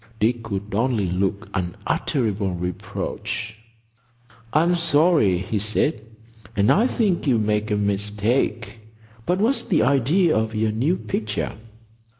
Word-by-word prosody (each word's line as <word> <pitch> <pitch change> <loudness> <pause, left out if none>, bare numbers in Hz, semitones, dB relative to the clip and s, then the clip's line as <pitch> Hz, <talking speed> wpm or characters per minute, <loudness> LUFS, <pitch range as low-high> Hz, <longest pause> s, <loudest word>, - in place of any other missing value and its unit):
Dick 115 +2 +1
could 100 -2 -5
only 110 -2 +1
look 100 +3 -1
unutterable 100 +2 -1
reproach. 90 +4 -4 1.0
"I'm 170 +4 +3
sorry," 160 - +3
he 100 +4 -2
said, 110 +5 0 0.5
"and 100 0 +3
I 225 +6 +4
think 200 - 0
you 125 -4 +4
make 105 0 0
a 105 - +1
mistake. 105 +3 -1 0.5
But 180 +1 +2
what's 230 +7 +1
the 160 -6 +2
idea 140 +7 +3
of 110 0 -1
your 110 0 +1
new 135 +12 +1
picture?" 110 0 -3
110 Hz, 125 wpm, -23 LUFS, 105-145 Hz, 1.0 s, I